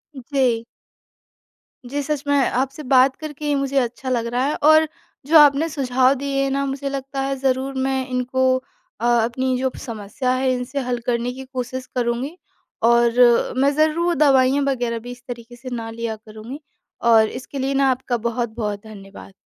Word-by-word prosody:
जी। 255 -3 0 1.2
जी, 285 +4 -3
सच 290 0 -3
में 285 0 +3
आपसे 270 +2 0
बात 260 0 +4
करके 300 -1 -8
ही 295 -1 +1
मुझे 275 0 -1
अच्छा 250 +1 -3
लग 235 -2 0
रहा 250 +1 +1
है। 290 - 0
और 315 +1 +6 0.4
जो 320 +3 +6
आपने 295 +1 +6
सुझाव 260 -3 +2
दिए 275 0 -1
ना 275 +1 0
मुझे 275 0 -3
लगता 275 0 -4
है 275 0 -1
ज़रूर 265 0 0
मैं 265 -1 -1
इनको 255 0 +1 0.4
अ, 235 - -2
अपनी 240 +2 +1
जो 260 +1 0
समस्या 225 +3 -3
है 260 0 +1
इनसे 250 +2 -3
हल 250 -1 -2
करने 240 0 0
की 265 +1 -8
कोशिश 255 0 -5
करूँगी। 245 +6 -2 0.5
और 235 +1 +4
मैं 275 +2 +3
ज़रूर 320 +3 +2
दवाइयाँ 275 -1 +4
वग़ैरह 245 -4 -1
भी 245 +2 -9
इस 245 0 -12
तरीक़े 240 -1 -8
से 255 +2 -9
ना 225 -1 -5
लिया 230 -1 -4
करूँगी 220 +5 -10 0.5
और 220 -1 +6
इसके 270 +2 -7
लिए 270 +1 -1
ना 275 0 +3
आपका 255 -1 -2
बहुत-बहुत 225 -3 -3
धन्यवाद। 200 -2 -12
260 Hz, 170 wpm, -21 LUFS, 240-275 Hz, 1.2 s, और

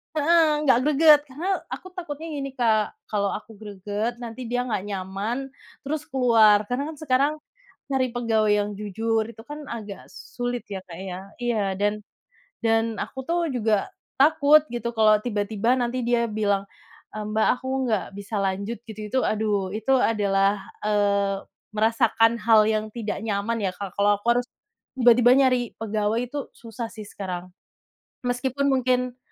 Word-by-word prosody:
heeh. 325 +2 +4 0.2
Enggak 260 -5 +4
greget, 300 0 +6
karena 355 +9 -1 0.2
aku 370 - -7
takutnya 330 -3 -6
gini 275 0 -3
Kak, 220 -3 +2 0.2
kalau 200 -2 0
aku 215 +1 -7
greget 210 +2 -4
nanti 235 +2 -7
dia 245 0 0
enggak 210 -5 -2
nyaman, 195 +5 -3 0.5
terus 300 +2 -3
keluar. 225 -5 +5
Karena 250 +3 -1
kan - - -15
sekarang 280 +1 +2 0.5
nyari 260 -3 0
pegawai 220 -3 +2
yang 205 0 +1
jujur 220 +2 -1
itu 225 - -14
kan 295 0 -7
agak 210 -4 -7
sulit 245 0 -5
ya 190 - -3
Kak, 170 - -9
ya. 190 -1 -6 0.2
Iya. 225 -4 +1
Dan 205 +1 +1 0.7
dan, 225 -1 +1
aku 265 - -5
tuh 340 0 +1
juga 220 -3 +1 0.3
takut 300 +1 +6
gitu 235 0 -2
kalau 215 -1 +5
tiba-tiba 220 +2 0
nanti 245 0 -1
dia 235 0 +1
bilang, 205 -2 0 0.5
eee, 215 - -4
"Mbak, 220 +1 +1
aku 260 - -9 0.2
enggak 215 -6 0
bisa 200 +2 -8
lanjut," 200 +4 -2
gitu 215 0 -8
itu 260 - +1
aduh, 205 -3 0
itu 220 +6 -1
adalah, 200 -3 +1 0.2
eee, 200 -1 +1 0.4
merasakan 225 +1 +3
hal 220 -1 +6
yang 215 0 0
tidak 220 -2 -4
nyaman 215 +1 -1
ya 190 - +1
Kak. 195 -1 -7
Kalau 205 0 +3
aku 205 - -17
harus, 245 - -2 0.5
tiba-tiba 245 0 +6
nyari 255 -3 +2
pegawai 215 0 -1
itu 280 +2 -6
susah 230 0 -7
sih 215 -2 -9
sekarang. 185 -3 -6 0.8
Meskipun 265 +3 0
mungkin 250 -1 +1
225 Hz, 155 wpm, -24 LUFS, 205-250 Hz, 0.8 s, greget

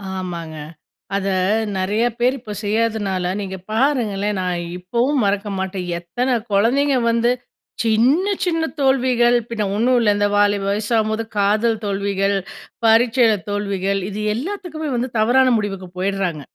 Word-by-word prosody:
ஆமாங்க. 170 -4 -5 0.6
அத 200 0 -1 0.5
நிறைய 200 +4 0 0.2
பேரு 250 +2 +2
இப்போ 215 -3 -8
செய்யாதனால, 205 -4 0
நீங்க 190 -1 -5
பாருங்களேன், 215 -5 0
நான் 180 -1 -1 0.2
இப்பவும் 240 +9 0
மறக்க 200 +1 0
மாட்டேன். 190 -1 -3
எத்தன 245 +9 -1 0.2
குழந்தைங்க 260 +7 +3
வந்து 235 +1 +2 0.5
சின்ன, 240 - +3 0.2
சின்ன 330 -2 0 0.2
தோல்விகள் 255 -3 +3
பின்னே 220 -3 -2
ஒன்னும் 245 +4 +3
இல்ல, 225 -3 +3
இந்த 205 0 +2
வாலிப 205 -1 +3
வயசாகும்போது 220 +1 0
காதல் 215 +3 +2
தோல்விகள், 200 0 0 0.5
பரீட்சைல 230 0 +4
தோல்விகள். 200 -1 -1
இது 210 +1 -5
எல்லாத்துக்குமே 320 - -4
வந்து 245 +2 -1
தவறான 255 +4 +4
முடிவுக்கு 195 -3 -4
போயிடுறாங்க. 185 -5 -1
215 Hz, 125 wpm, -20 LUFS, 195-245 Hz, 0.6 s, பரீட்சைல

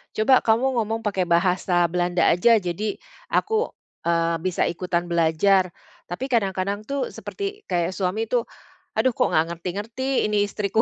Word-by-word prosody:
"Coba 250 +4 +5
kamu 240 +2 +2
ngomong 225 +1 -1
pakai 195 -4 -1
bahasa 175 +1 +2
Belanda 175 0 +1
aja 230 +7 +5
jadi 190 +4 -3 0.4
aku, 445 +3 +1 0.4
eee, 170 0 +2
bisa 185 -2 0
ikutan 175 0 -2
belajar." 170 +3 +3 0.4
Tapi 255 +10 -5
kadang-kadang 200 -1 -1
tuh 280 -1 -2
seperti 405 +1 -6
kayak 175 0 0
suami 195 +4 -1
tuh, 240 -2 +1 0.5
"Aduh 250 +3 +3
kok - - +2
nggak 155 +1 +3
ngerti-ngerti 220 +10 -2
ini 210 -1 +2
istriku." 210 +1 0
200 Hz, 145 wpm, -23 LUFS, 175-230 Hz, 0.5 s, Coba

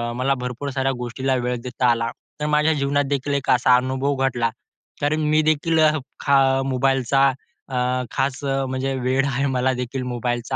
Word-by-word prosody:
मला 130 +2 +1
भरपूर 125 +3 -4
साऱ्या 135 0 0
गोष्टीला 130 +2 -1
वेळ 125 0 -1
देता 125 0 -1
आला. 115 0 0 0.3
तर 150 - -2
माझ्या 150 +1 +3
जीवनात 145 0 +1
देखील 140 0 -1
एक 140 - -2
असा 125 0 +5
अनुभव 130 +2 0
घडला 120 -2 0 0.5
तर 145 +2 +1
मी 155 0 +2
देखील 155 +1 +1
अ, 155 -1 +6 0.3
खा 140 -1 +3 0.3
मोबाईलचा 135 0 +2 0.4
अ, 125 0 0
खास 135 0 -1
म्हणजे 135 0 -1
वेड 130 +2 +1
आहे 135 0 0
मला 130 +1 +2
देखील 130 +1 -4
मोबाईलचा 120 +2 -2
135 Hz, 165 wpm, -22 LUFS, 125-140 Hz, 0.5 s, अ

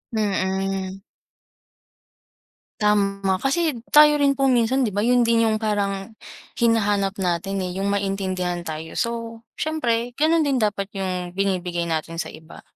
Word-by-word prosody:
Mm. 195 -2 -1 1.8
Tama. 195 -2 +1
Kasi 310 +2 +1 0.2
tayo 300 0 +6
rin 275 -1 +3
po 275 - +2
minsan 255 0 +3
'di 210 - -3
ba 205 - 0
yun 245 +2 +3
din 230 0 +3
yung 215 - +1
parang 205 -1 -2 0.5
hinahanap 205 -4 +2
natin 185 +1 -1
eh, 180 - -4
yung 200 - 0
maintindihan 190 -3 -1
tayo. 160 -1 -6
So 230 -1 -3 0.2
siyempre 245 -6 -1
ganun 315 +4 +2
din 270 -4 +1
dapat 205 -2 0
yung 185 -2 -3
binibigay 180 -3 -1
natin 165 +1 -2
sa - - -6
iba. 155 +1 -13
200 Hz, 135 wpm, -23 LUFS, 190-235 Hz, 1.8 s, tayo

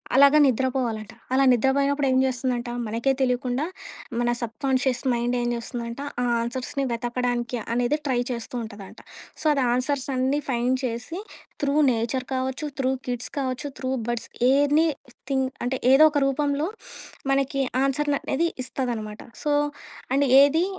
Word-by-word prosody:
అలాగా 280 +2 +7
నిద్రపోవాలట. 245 -4 0 0.2
అలా 270 +1 +4
నిద్రపోయినప్పుడు 275 +3 +2
ఏం 260 - +3
జేస్తుందంట? 250 -1 -1 0.2
మనకే 230 +5 +1
తెలియకుండా 250 +2 0 0.5
మన 240 0 +1
సబ్‌కాన్‌షియస్ 260 +2 0
మైండ్ 240 +1 0
ఏం 240 - -1
చేస్తుందంట 235 +2 -5 0.2
ఆ - - +1 0.2
ఆన్సర్స్‌ని 255 +3 -3
వెతకడానికి 240 0 -1 0.2
అనేదే 245 +5 +1
ట్రై 250 -2 +1
చేస్తూ 235 +1 -5
ఉంటదంట. 205 -3 -10 0.4
సో, - - -8
అది 275 -2 +1
ఆన్సర్స్ 265 +1 0
అన్నీ 265 +3 +1
ఫైండ్ 250 +1 +1
చేసి 245 +9 -4 0.4
త్రూ 285 0 +1 0.2
నేచర్ 235 +2 -1
కావచ్చు, 265 +3 -2
త్రూ 260 0 +2 0.2
కిడ్స్ 245 0 -3
కావచ్చు, 260 +1 -2
త్రూ 260 -1 -2 0.2
బర్డ్స్, 240 -1 -2 0.2
ఎనీ 290 +4 +4 0.4
థింగ్ 265 -1 +1 0.2
అంటే 260 +1 -1 0.2
ఏదో 305 +3 +8
ఒక 290 - +1
రూపంలో 285 +2 0 0.6
మనకి 275 0 +1 0.2
ఆన్సర్‌‌ 285 +2 +1
అనేది 335 +5 0 0.2
ఇస్తదనమాట. 225 -5 -4 0.2
సో 295 - +1 0.6
అండ్ 280 0 +3
ఏది 315 +5 +4
260 Hz, 135 wpm, -25 LUFS, 240-275 Hz, 0.6 s, ఏదో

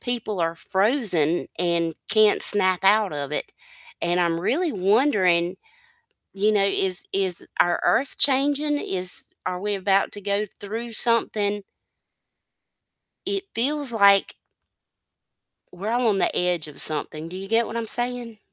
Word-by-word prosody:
people 230 -5 -4
are 165 0 -1
frozen, 190 - 0
and 170 -1 -1 0.2
can't 215 -1 +3
snap 185 -3 +3
out 205 -1 +3
of 145 -1 -5
it, - - -4 0.5
and 175 +1 0
I'm 170 -1 0
really 315 - -1
wondering, 190 -4 +1 0.8
you 205 +2 +1
know, 205 -2 +2
is 190 -1 +1
is 190 -3 -1
our 175 0 +2
earth 275 - +1
changing, 290 +2 +2
is 185 -8 +2 0.2
are 180 0 -3
we 205 +1 -2
about 195 0 0
to 205 - -8
go 200 +1 -1
through 225 +3 -6
something? 215 -3 +2 1.6
It 395 0 -2
feels 280 +2 0
like 200 -3 +3 1.4
we're 195 +4 -5
all 240 0 +1
on 200 -3 +1
the - - 0
edge 175 -3 0
of 150 - -7
something. 155 +1 0
Do 180 - -9
you 195 +1 -8
get 225 +2 +1
what 225 - -7
I'm 230 -1 -4
saying? 240 -2 -4
200 Hz, 140 wpm, -23 LUFS, 180-230 Hz, 1.6 s, can't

